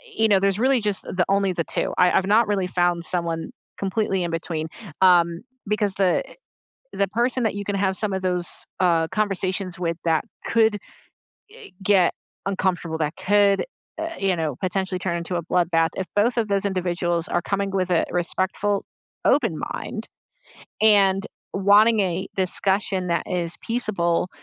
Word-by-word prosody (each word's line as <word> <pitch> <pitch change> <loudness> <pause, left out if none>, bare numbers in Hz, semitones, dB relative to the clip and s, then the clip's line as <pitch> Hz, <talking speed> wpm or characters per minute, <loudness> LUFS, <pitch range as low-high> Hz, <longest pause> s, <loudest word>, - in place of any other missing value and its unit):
you 220 - +3
know, 200 -3 +4
there's 195 +1 +1
really 260 0 +3
just 205 -2 -1
the 180 -1 -1
only 195 -1 +2
the 170 - -1
2. - - -2
I 180 - +5
I've 190 - +2
not 215 +2 +4
really 195 -3 0
found 175 -1 0
someone 165 -2 -2 0.3
completely 195 -1 -1
in 170 - -2
between, 165 -1 -3 0.3
um, 170 -2 +4 0.3
because 210 -1 0
the 190 -2 +2
eh, - - -13 0.6
the 200 - +1
person 240 +3 0
that 220 - +1
you 200 - -4
can 205 - -2
have 190 -1 +1
some 210 -2 -1
of 190 - -2
those, 180 -1 -1 0.3
uh, 165 -3 +3
conversations 195 -3 -1
with 170 -2 -2
that 160 -1 +2 0.2
could, 220 -2 +3 0.8
eh, - - -12
get 195 -4 +4 0.3
uncomfortable, 185 -4 -1
that 150 0 -1
could, 200 0 +3 0.3
uh, 325 +1 -2
you 195 -2 +1
know, 155 -4 -2
potentially 185 0 -1
turn 170 -2 -1
into 170 +1 -4
a 170 - -1
bloodbath, 165 -1 +2
if 190 - -2
both 235 +4 +2
of 225 -2 +1
those 200 -1 0
individuals 175 -3 -1
are 175 - 0
coming 200 +2 -2
with 185 -1 0
a 175 -2 +2
respectful, 190 +3 -1 0.4
open - - +2
mind - - -5 0.8
and 200 -2 +4 0.3
wanting 205 +3 +5
a 185 0 -1
discussion 190 0 0
that 170 - +1
is 175 -2 -2
peaceable, 190 -8 0
190 Hz, 165 wpm, -23 LUFS, 175-205 Hz, 0.8 s, I